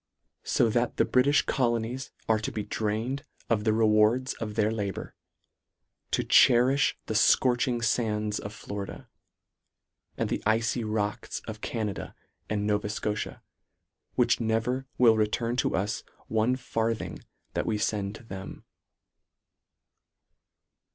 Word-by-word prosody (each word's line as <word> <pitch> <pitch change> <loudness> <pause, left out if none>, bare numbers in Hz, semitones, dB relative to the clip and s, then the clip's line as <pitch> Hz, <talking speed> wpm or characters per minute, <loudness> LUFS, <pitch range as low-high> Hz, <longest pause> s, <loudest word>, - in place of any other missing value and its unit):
So - - +3
that 120 +1 0
the - - +4
Britifh 140 +3 +3
colonies 120 +1 -1 0.2
are 110 -1 +3
to 110 - -3
be 105 - -3
drained 110 +8 -2 0.3
of 105 -2 +1
the 110 - +4
rewards 110 +3 +3
of 105 -2 -6
their 110 -1 +2
labour, 100 -4 -4 1.0
to - - +1
cherifh 130 +4 +5
the - - -3
fcorching 125 -1 +3
fands 105 -3 0
of 105 - -6
Florida, 100 -1 -7 1.1
and - - 0
the - - -2
icy 115 +2 +1
rocks 110 +1 -2
of 110 -1 -8
Canada 110 -4 -4 0.3
and 105 -1 -1
Nova 105 0 0
Scotia, 105 0 -3 0.7
which - - +3
never 115 +4 0
will 115 -3 +6
return 115 +2 0
to - - +1
us 100 +3 -1 0.3
one 110 +3 +2
farthing 115 -3 -2 0.3
that - - -1
we 110 - +1
fend 105 -1 -1
to - - -12
them. 95 -3 -8
110 Hz, 125 wpm, -28 LUFS, 105-120 Hz, 1.1 s, will